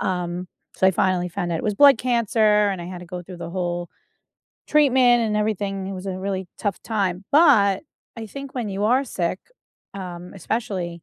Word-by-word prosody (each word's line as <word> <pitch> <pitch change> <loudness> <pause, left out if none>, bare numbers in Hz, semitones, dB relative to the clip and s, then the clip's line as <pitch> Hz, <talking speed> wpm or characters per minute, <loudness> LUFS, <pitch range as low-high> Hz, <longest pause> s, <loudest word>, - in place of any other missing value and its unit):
um, 180 0 -2 0.3
so 190 - +3
I - - +6
finally 180 0 +1
found 175 0 -3
out 165 - -1
it - - -6
was 210 -1 0
blood 275 -1 +7
cancer 220 -4 +2
and 190 -3 -3
I - - -7
had 180 0 -7
to 180 - -10
go 180 0 -6
through 180 +1 -10
the 170 -1 -6
whole 175 -1 -3 0.8
treatment 255 -5 +4
and 215 -2 0
everything, 200 -2 -1
it 195 - -5
was 185 +1 -7
a 185 -1 -3
really 190 -1 -3
tough 205 -4 -3
time, 195 -4 -2
but 260 - +5 0.3
I 225 -1 -6
think 275 +4 -9
when 240 -4 -3
you 200 +1 -2
are 255 +5 +3
sick, 185 -7 -2 0.6
um, 180 -2 -7
especially 185 -5 -3
195 Hz, 195 wpm, -23 LUFS, 180-225 Hz, 0.8 s, blood